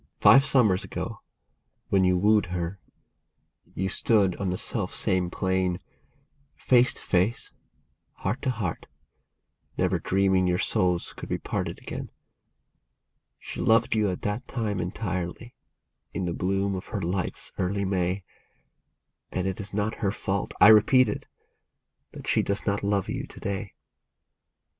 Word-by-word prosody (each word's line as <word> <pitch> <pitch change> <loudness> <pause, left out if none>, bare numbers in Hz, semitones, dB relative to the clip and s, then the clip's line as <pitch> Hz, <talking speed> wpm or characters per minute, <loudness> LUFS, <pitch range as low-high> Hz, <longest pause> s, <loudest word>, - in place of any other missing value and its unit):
Five 135 +1 +7
summers 115 -9 +3
ago, - - -5 0.7
when 95 -1 +3
you 90 0 +3
wooed 105 +1 +3
her, 90 +1 -4 1.0
you 95 - -1
stood 100 -1 +2
on 100 -2 -2
the 90 - -1
self - - -3
same 90 -1 +1
plane, 95 0 0 0.8
Face 125 - +4
to - - -10
face, 95 +5 0 0.6
heart 105 +9 -3
to - - -1
heart, 105 -9 -3 0.9
never 90 -1 +1
dreaming 95 +1 +2
your 90 0 +2
souls 90 -1 +1
could - - -9
be - - 0
parted - - -3
again. - - -7 1.3
She - - -7
loved 115 +1 +3
you 105 -2 +2
at 90 - -5
that 105 +5 -2
time 105 -5 -2
entirely, 95 +4 -4 0.6
in 95 - -1
the 85 - -2
bloom 95 +2 0
of 95 0 -5
her 105 - -3
life's 90 +1 -3
early 100 +2 0
May, 95 0 -1 1.1
And 90 - -2
it 95 -1 -2
is 100 0 -4
not 105 +2 -2
her 100 - +2
fault, 100 -2 -2
I 105 - +9
repeat 110 +3 +6
it, - - -5 0.9
that - - -9
she - - +3
does 100 0 -1
not 100 -1 0
love 100 -1 0
you - - -4
to - - -12
day. 100 0 -4
95 Hz, 145 wpm, -26 LUFS, 90-105 Hz, 1.3 s, I